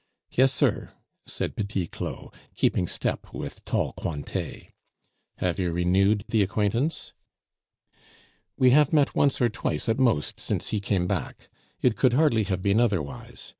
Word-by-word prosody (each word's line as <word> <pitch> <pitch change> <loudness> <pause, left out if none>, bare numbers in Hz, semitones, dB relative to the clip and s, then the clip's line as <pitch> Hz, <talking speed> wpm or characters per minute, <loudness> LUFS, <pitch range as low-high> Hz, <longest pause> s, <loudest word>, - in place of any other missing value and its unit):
"Yes, 130 +1 +4
sir," - - 0 0.3
said - - -3
Petit 100 -3 -2
Claud, - - -7 0.2
keeping 90 - +1
step - - -3
with - - -6
tall - - -1
Cointet. 75 -4 -5 0.6
"Have 90 -1 -1
you 90 -2 0
renewed 95 +4 +2
the 110 - +3
acquaintance?" 105 - -1 1.4
"We 130 -1 +5
have 145 +1 +5
met 145 -3 +3
once 140 -2 +2
or 120 - +3
twice 120 +2 -3
at 115 +3 +1
most 115 - +1
since - - -2
he 105 - -1
came 95 -3 0
back. 90 -7 -4 0.3
It 120 -3 +3
could 130 -3 +3
hardly 125 -6 +3
have 95 -1 -2
been 100 +2 +3
otherwise. 100 -12 -2
105 Hz, 145 wpm, -26 LUFS, 95-125 Hz, 1.4 s, We